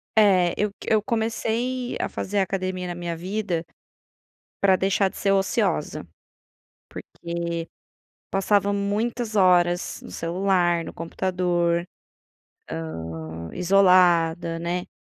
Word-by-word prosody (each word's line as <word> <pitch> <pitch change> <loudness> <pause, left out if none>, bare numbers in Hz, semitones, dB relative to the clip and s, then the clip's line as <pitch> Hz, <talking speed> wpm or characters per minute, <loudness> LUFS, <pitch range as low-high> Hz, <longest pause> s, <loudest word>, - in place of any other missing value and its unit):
É 185 -5 +5
eu 210 0 +1
c - - -5
eu 215 -1 +4
comecei 235 +2 -1
a - - 0
fazer 205 +1 -2
academia 185 -1 -2
na 175 - -4
minha 175 -1 -4
vida 180 -1 -3 1.0
para 190 -1 +5
deixar 195 +1 +2
de - - -14
ser 195 - +1
ociosa, 190 - 0 0.8
porque 170 -1 -5 0.6
passava 200 +1 +2
muitas 215 +3 -1
horas 175 -2 +3
no - - -10
celular, 175 -1 +1
no - - -7
computador, 175 0 0 0.8
hã, 80 0 -6
isolada, 175 -3 +4
né. 175 +1 -3
180 Hz, 110 wpm, -24 LUFS, 170-200 Hz, 1.0 s, É